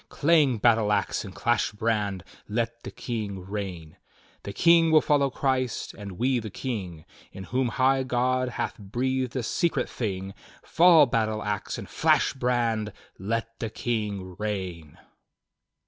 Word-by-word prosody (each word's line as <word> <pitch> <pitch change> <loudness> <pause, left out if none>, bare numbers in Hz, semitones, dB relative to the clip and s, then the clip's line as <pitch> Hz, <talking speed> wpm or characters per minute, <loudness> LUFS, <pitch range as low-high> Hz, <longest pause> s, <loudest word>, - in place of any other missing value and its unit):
Clang 145 -5 +3
battle 110 -1 +3
ax, 100 -2 0
and 95 -3 -10
clash 120 -2 +1
brand! 105 -4 -1 0.3
Let 115 +2 -2
the - - -7
King 105 -6 -5
reign! 95 -6 -6 0.4
"'The 100 - -7
King 170 +4 +5
will 160 -1 +7
follow 145 -2 +2
Christ, 130 -3 -1
and 100 -3 -8
we 125 +6 +1
the 110 -1 -6
King, 95 -9 -5 0.3
In 95 - -8
whom 125 +5 0
high 130 +2 +2
God 130 0 0
hath 120 - -4
breathed 125 +5 -2
a 130 - -1
secret 170 +8 0
thing. 95 -4 -4 0.3
Fall 165 -3 +6
battle 110 -3 -1
ax, 105 -1 -3
and - - -7
flash - - +2
brand! 120 -5 0 0.3
Let 115 +3 -3
the 115 - -3
King 105 -6 -3
reign!" 95 -7 -4
115 Hz, 145 wpm, -26 LUFS, 100-130 Hz, 0.4 s, will